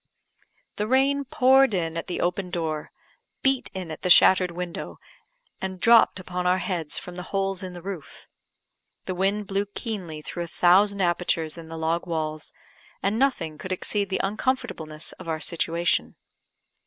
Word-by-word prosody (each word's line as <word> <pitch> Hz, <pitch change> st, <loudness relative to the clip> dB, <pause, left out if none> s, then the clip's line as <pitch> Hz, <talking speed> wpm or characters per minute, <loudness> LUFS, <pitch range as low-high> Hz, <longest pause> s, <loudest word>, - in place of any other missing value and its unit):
The 210 Hz, -, -1 dB
rain 275 Hz, +3 st, +2 dB
poured 265 Hz, -2 st, +4 dB
in 165 Hz, -2 st, -1 dB
at 165 Hz, -, -4 dB
the 180 Hz, -, -3 dB
open 180 Hz, +1 st, -1 dB
door, 160 Hz, -3 st, -3 dB, 0.5 s
beat 270 Hz, -1 st, +1 dB
in 185 Hz, -4 st, -6 dB
at 155 Hz, -, -7 dB
the 180 Hz, -, -1 dB
shattered 185 Hz, +1 st, +7 dB
window, 175 Hz, 0 st, -6 dB, 0.6 s
and 190 Hz, -1 st, -4 dB
dropped 230 Hz, -2 st, +5 dB
upon 180 Hz, 0 st, -3 dB
our 180 Hz, +1 st, +4 dB
heads 175 Hz, -5 st, -2 dB
from 180 Hz, -1 st, -7 dB
the -, -, -4 dB
holes 195 Hz, -1 st, -1 dB
in 185 Hz, -1 st, -6 dB
the 175 Hz, -1 st, -10 dB
roof. 190 Hz, -6 st, -8 dB, 0.8 s
The 185 Hz, -, -2 dB
wind 195 Hz, +3 st, 0 dB
blew 200 Hz, +1 st, -1 dB
keenly 190 Hz, -8 st, -6 dB
through 175 Hz, +2 st, -4 dB
a -, -, -10 dB
thousand 195 Hz, +4 st, +4 dB
apertures 175 Hz, -3 st, 0 dB
in 165 Hz, -1 st, -10 dB
the 165 Hz, -, -6 dB
log 165 Hz, +2 st, -1 dB
walls; 155 Hz, -2 st, -3 dB, 0.5 s
and 200 Hz, +4 st, +1 dB
nothing 165 Hz, -, 0 dB
could 185 Hz, -, -6 dB
exceed 200 Hz, +2 st, -1 dB
the 190 Hz, -, -1 dB
uncomfortableness 195 Hz, -, -2 dB
of -, -, -10 dB
our 160 Hz, -1 st, -1 dB
situation. 170 Hz, +1 st, 0 dB
180 Hz, 165 wpm, -25 LUFS, 165-200 Hz, 0.8 s, shattered